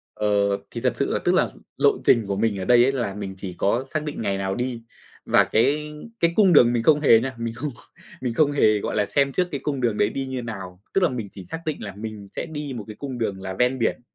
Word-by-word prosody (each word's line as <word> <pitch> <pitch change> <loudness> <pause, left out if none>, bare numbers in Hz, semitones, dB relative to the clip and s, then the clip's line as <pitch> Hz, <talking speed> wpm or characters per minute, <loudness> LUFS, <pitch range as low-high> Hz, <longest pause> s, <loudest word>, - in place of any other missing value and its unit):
Ờ, 105 - -1 0.4
thì - - -5
thật - - +1
sự - - +1
là - - 0
tức - - +3
là - - +3 0.3
lộ - - +3
trình 115 -3 +4
của 100 - -1
mình 105 -1 0
ở 95 - -4
đây 120 -1 +6
ấy, 130 - +3
là 120 -7 -2
mình 100 -2 -6
chỉ 95 -2 -6
có 120 +7 +1
xác 155 -1 -1
định 150 -6 -5
ngày 100 -2 -1
nào 95 0 -2
đi, 120 -2 -3 0.4
và - - +5
cái 150 +6 +1 0.3
cái 170 0 +2
cung 195 -5 +5
đường 120 -4 +6
mình 115 - 0
không 150 +3 +5
hề 115 -6 +6
nha, 130 +3 -3
mình 115 -1 -3
không 145 +6 -4 0.5
mình 125 -2 -2
không 145 +3 +3
hề, 110 -7 +3
gọi - - -3
là, 105 - +2
xem 140 +5 +1
trước 180 +5 0
cái 140 - -3
cung 140 -3 -2
đường 115 -3 +1
đấy 105 - +3
đi 135 +2 -4
như 130 -1 -4
nào. 95 -6 -7
Tức 195 - +2
là 170 - +4
mình 115 -6 -5
chỉ 95 - -10
xác 165 - -6
định 155 - -3
là 100 -3 -6
mình 105 -1 -7
sẽ - - -3
đi 150 -4 -5
một 115 - -5
cái 105 - -8
cung 135 -3 -5
đường 100 -4 -2
là 95 0 -5
ven 125 +1 +2
biển 115 - 0
120 Hz, 275 wpm, -23 LUFS, 105-140 Hz, 0.5 s, đây